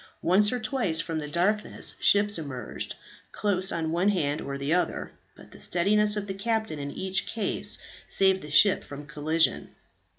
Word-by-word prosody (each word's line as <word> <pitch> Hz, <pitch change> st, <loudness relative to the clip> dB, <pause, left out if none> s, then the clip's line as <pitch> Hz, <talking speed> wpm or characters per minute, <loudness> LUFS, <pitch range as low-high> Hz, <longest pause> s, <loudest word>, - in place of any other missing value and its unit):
Once 200 Hz, +4 st, +4 dB
or 250 Hz, -, -1 dB
twice 220 Hz, -8 st, 0 dB
from 165 Hz, -1 st, -2 dB
the 150 Hz, -, -5 dB
darkness 185 Hz, +7 st, -1 dB
ships 205 Hz, -2 st, +3 dB
emerged, 130 Hz, -7 st, -6 dB, 0.4 s
close 195 Hz, -2 st, -1 dB
on 160 Hz, -1 st, -2 dB
one 175 Hz, +4 st, +2 dB
hand 150 Hz, -7 st, 0 dB
or 140 Hz, 0 st, -5 dB
the 140 Hz, +3 st, -1 dB
other; 180 Hz, -, -1 dB, 0.2 s
but -, -, -16 dB
the -, -, -14 dB
steadiness 210 Hz, +4 st, +2 dB
of 205 Hz, -, -3 dB
the 195 Hz, -, -4 dB
captain 220 Hz, -4 st, -2 dB
in 140 Hz, 0 st, -4 dB
each 190 Hz, +5 st, -1 dB
case 215 Hz, -4 st, -1 dB, 0.3 s
saved 190 Hz, -1 st, +3 dB
the 150 Hz, -, -9 dB
ship 170 Hz, +7 st, +5 dB
from 145 Hz, +1 st, -9 dB
collision. 155 Hz, +2 st, 0 dB
185 Hz, 170 wpm, -27 LUFS, 155-205 Hz, 0.4 s, ship